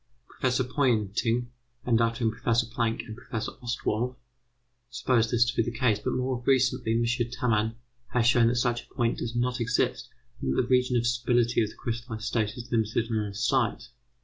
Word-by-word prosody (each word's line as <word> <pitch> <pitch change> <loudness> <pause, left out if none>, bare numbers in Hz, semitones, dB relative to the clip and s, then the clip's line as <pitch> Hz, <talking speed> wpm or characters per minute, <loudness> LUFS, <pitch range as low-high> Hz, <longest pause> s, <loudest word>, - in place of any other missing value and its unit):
Professor 130 0 0
Poynting, 120 -2 0 0.3
and 115 -2 +3
after 115 +1 0
him 110 - +3
Professor 115 +1 +1
Planck 115 0 -1
and 110 - -8
Professor 115 -2 -5
Ostwald, 120 +1 -2 0.7
supposed 115 -2 +1
this 120 0 +4
to 125 +2 -2
be - - +3
the 120 +1 -3
case, 110 -4 +2
but - - -2
more 125 -1 -2
recently 130 -3 +2
M. 115 +1 +2
Tamman 115 -2 0 0.3
has 120 -2 +1
shown 120 -1 +5
that 120 - +2
such 120 0 +1
a - - -26
point 120 -3 0
does 120 0 -4
not 125 +1 0
exist, 115 0 0 0.3
and 65 0 -1
that - - +5
the - - -6
region 125 -1 +3
of 120 - 0
stability 120 0 +2
of 110 - 0
the - - -13
crystallized 115 -1 -5
state 110 -1 -1
is 120 0 -7
limited 115 0 0
on 110 -2 0
all 100 - -7
sides. 120 0 0
120 Hz, 190 wpm, -27 LUFS, 115-125 Hz, 0.7 s, shown